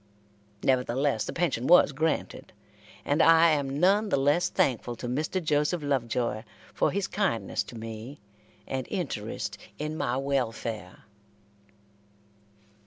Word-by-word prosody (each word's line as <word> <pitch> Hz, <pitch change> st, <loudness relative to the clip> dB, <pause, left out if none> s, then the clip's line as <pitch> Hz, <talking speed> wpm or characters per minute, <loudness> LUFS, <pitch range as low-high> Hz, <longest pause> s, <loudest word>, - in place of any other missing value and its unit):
Nevertheless 130 Hz, -1 st, +1 dB
the -, -, -4 dB
pension 145 Hz, -8 st, -1 dB
was 175 Hz, -3 st, +7 dB
granted, 155 Hz, +3 st, -2 dB, 0.5 s
and 145 Hz, +3 st, +2 dB
I 165 Hz, 0 st, +6 dB
am 140 Hz, -2 st, -1 dB
none 200 Hz, +5 st, +3 dB
the -, -, +2 dB
less 145 Hz, +7 st, +2 dB
thankful 125 Hz, -, 0 dB
to 120 Hz, -, -6 dB
Mr. 155 Hz, +9 st, -1 dB
Joseph 150 Hz, +1 st, +1 dB
Lovejoy 120 Hz, -5 st, -1 dB, 0.3 s
for -, -, +2 dB
his -, -, -1 dB
kindness -, -, -1 dB
to 120 Hz, -, -10 dB
me, 115 Hz, +5 st, -8 dB, 0.5 s
and 130 Hz, -1 st, -4 dB
interest 110 Hz, -, -4 dB, 0.2 s
in 150 Hz, +1 st, -4 dB
my 125 Hz, -5 st, -1 dB
welfare. 115 Hz, -7 st, -3 dB
140 Hz, 120 wpm, -28 LUFS, 120-155 Hz, 0.5 s, was